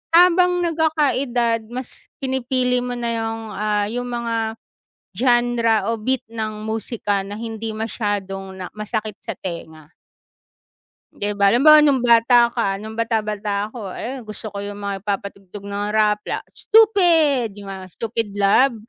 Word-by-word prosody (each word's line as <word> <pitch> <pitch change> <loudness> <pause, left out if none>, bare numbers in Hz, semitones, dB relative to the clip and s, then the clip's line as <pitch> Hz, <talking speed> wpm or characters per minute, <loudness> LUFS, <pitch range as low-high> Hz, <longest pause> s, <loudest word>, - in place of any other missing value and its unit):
Habang 360 +1 +5
nagkakaedad, 275 -8 +1
mas 255 0 -8 0.2
pinipili 255 -1 +1
mo 245 0 -3
na 235 -1 -2
'yong 225 0 -3
ah, 210 0 0
'yong 245 +1 -3
mga 235 -1 -2 0.8
genre, 240 -2 +3 0.2
o 230 - -1
beat, 260 +3 0
ng 215 -1 -4
musika 220 -3 -2
na 200 +1 -7
hindi 225 -1 -4
masyadong 205 -3 -3
na 185 -1 -6
masakit 215 0 -4
sa 225 - -4
tenga. 160 -3 -8 1.2
Di 205 0 -2
ba? 200 -1 +3
Halimbawa 295 +8 +7
no'ng 280 -4 +3
bata 235 0 +5
ka 215 -5 0
no'ng 220 +2 -8
bata-bata 210 -2 -1
ako. 210 -6 -7
Ayon 250 -2 -6
gusto 215 0 -7
ko 200 - -6
'yong 205 0 -5
mga 200 -1 -4
nagpapatugtog 200 0 -5
ng 200 0 -3
rap 210 -1 +3
la - - -3
Stupid 345 - +4
'yong 200 -1 -10
mga 190 -1 -8
Stupid 230 -1 -2
Love. 205 +6 +4
225 Hz, 145 wpm, -21 LUFS, 205-245 Hz, 1.2 s, Halimbawa